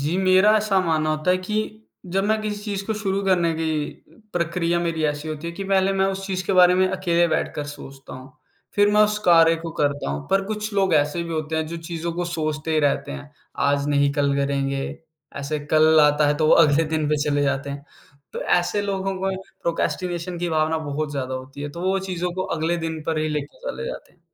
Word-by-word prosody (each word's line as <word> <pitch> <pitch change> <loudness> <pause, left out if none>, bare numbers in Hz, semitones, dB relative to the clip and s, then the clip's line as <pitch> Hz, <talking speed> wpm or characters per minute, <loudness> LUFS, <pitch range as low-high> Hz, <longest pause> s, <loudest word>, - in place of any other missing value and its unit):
जी, 150 +5 -1
मेरा 190 +3 +5
ऐसा 210 -2 +2
मानना 160 -3 +1
होता 155 +3 0
है 180 - +4
कि 185 +3 -5 0.6
जब 195 - +2
मैं 215 +1 +1
किसी 210 -1 -4
चीज़ 200 -2 -4
को 220 - -1
शुरू 200 -2 -1
करने 175 -3 +2
की 160 0 -1 0.6
प्रक्रिया 170 0 0
मेरी 165 -2 -1
ऐसी 150 +1 -2
होती 155 +1 -5
है 170 - -4
कि 195 +3 -6
पहले 195 0 +2
मैं 195 0 +2
उस 195 0 -6
चीज़ 185 -1 -2
के - - +1
बारे 180 -1 +6
में 185 +1 +3
अकेले 175 -2 +1
बैठकर 160 -2 -1
सोचता 135 -1 -10
हूँ, 130 +1 -11 0.4
फिर 205 0 +4
मैं 210 - +5
उस 210 0 +2
कार्य 165 -1 +6
को 165 0 -6
करता 145 - 0
हूँ 70 +1 -5
पर 195 +1 +2
कुछ 210 +1 -4
लोग 190 -3 +2
ऐसे 150 +3 +1
भी 170 0 -5
होते 160 0 -2
हैं, 160 0 -1
जो 170 +2 -5
चीज़ों 165 0 -4
को 175 +1 -2
सोचते 155 -2 -3
ही 155 - +3
रहते 145 -1 0
हैं 145 0 -9 0.4
आज 140 0 +1
नहीं, 140 -1 +3
कल 140 -1 +1
करेंगे, 140 -1 -1 0.5
ऐसे 140 +2 -3
कल 155 0 +6
आता 150 0 +4
है, 145 - +2
तो 155 0 +2
वो - - +5
अगले 150 +2 +3
दिन 155 -1 -1
पे 150 - +2
चले 145 -1 +1
जाते 140 0 -1
हैं। 140 0 -7 0.5
तो - - -5
ऐसे 175 +3 +1
लोगों 195 -1 -2
को 190 +1 -1 0.3
प्रोक्रैस्टिनेशन 175 +1 -2
की 175 0 -2
भावना 160 0 +1
बहुत 150 0 -3
ज़्यादा 130 -2 -3
होती 130 +2 -8
है, 145 - -3
तो 170 - -8
वो 190 +2 +1
चीज़ों 180 -2 -3
को 185 - -1
अगले 165 +2 0
दिन 160 -1 -4
पर 160 -1 0
ही 155 0 0
लेके 150 - -4
चले - - -5
जाते - - -7
हैं, - - -32
165 Hz, 225 wpm, -23 LUFS, 150-185 Hz, 0.6 s, बारे